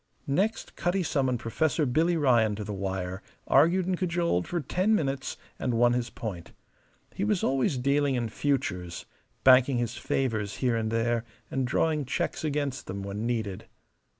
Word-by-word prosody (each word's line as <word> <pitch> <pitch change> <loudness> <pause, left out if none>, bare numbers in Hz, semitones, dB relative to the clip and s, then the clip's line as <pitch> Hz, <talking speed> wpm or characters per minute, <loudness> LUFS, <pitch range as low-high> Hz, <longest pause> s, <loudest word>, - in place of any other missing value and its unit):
Next, 200 +11 -1
Cutty 180 +2 0
summoned 130 -6 0
Professor 150 +7 +1
Billy 160 +7 +2
Ryan 120 -8 +3
to 105 - -5
the 105 - -5
wire, 95 -1 -3 0.2
argued 170 +6 +4
and 185 0 0
cajoled 170 - 0
for 175 - -1
ten 185 - +1
minutes, 135 -7 -2 0.2
and 125 -3 0
won 120 +1 +4
his 120 -1 -1
point. 95 -9 -7 0.6
He 195 - -3
was 210 -3 +1
always 135 +1 +1
dealing 140 +1 +2
in 120 -2 -1
futures 105 -10 -2 0.4
banking 130 0 +6
his 120 -1 -2
favours 110 -6 -1
here 125 -3 +1
and 110 -1 -1
there 115 +1 0 0.3
and 130 -2 0
drawing 150 +2 +1
checks 130 - -2
against 145 -3 -2
them 100 +1 -5
when 100 +3 -3
needed. 110 -6 -3
130 Hz, 160 wpm, -28 LUFS, 110-150 Hz, 0.6 s, banking